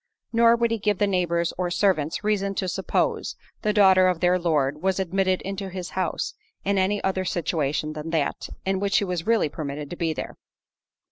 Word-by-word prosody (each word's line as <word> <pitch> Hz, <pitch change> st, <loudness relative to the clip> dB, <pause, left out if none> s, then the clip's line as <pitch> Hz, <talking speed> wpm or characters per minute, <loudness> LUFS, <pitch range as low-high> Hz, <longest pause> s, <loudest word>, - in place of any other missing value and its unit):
Nor 230 Hz, 0 st, +6 dB
would 235 Hz, -1 st, +1 dB
he 230 Hz, -, 0 dB
give 210 Hz, -1 st, +1 dB
the 205 Hz, -, +2 dB
neighbours 170 Hz, -3 st, 0 dB
or 180 Hz, -1 st, 0 dB
servants 175 Hz, -3 st, +1 dB
reason 200 Hz, -2 st, 0 dB
to 190 Hz, -, -1 dB
suppose, 180 Hz, -, -1 dB, 0.3 s
the 215 Hz, -, +1 dB
daughter 190 Hz, -3 st, +6 dB
of 180 Hz, -2 st, +1 dB
their 180 Hz, +1 st, +3 dB
Lord 150 Hz, -4 st, 0 dB
was 190 Hz, +1 st, +1 dB
admitted 190 Hz, 0 st, 0 dB
into 195 Hz, 0 st, -4 dB
his 185 Hz, -1 st, -6 dB
house, 190 Hz, -, -2 dB, 0.3 s
in 200 Hz, 0 st, +2 dB
any 200 Hz, +2 st, +1 dB
other 190 Hz, -1 st, 0 dB
situation 155 Hz, -4 st, -1 dB
than 155 Hz, +1 st, -6 dB
that, 160 Hz, -3 st, -1 dB, 0.2 s
in 190 Hz, 0 st, 0 dB
which 200 Hz, 0 st, -1 dB
she 200 Hz, -, +3 dB
really 180 Hz, +3 st, +1 dB
was 145 Hz, -, -14 dB
permitted 145 Hz, -1 st, -5 dB
to -, -, -4 dB
be 165 Hz, -2 st, -1 dB
there. 155 Hz, -, -6 dB
185 Hz, 195 wpm, -25 LUFS, 165-200 Hz, 0.3 s, Nor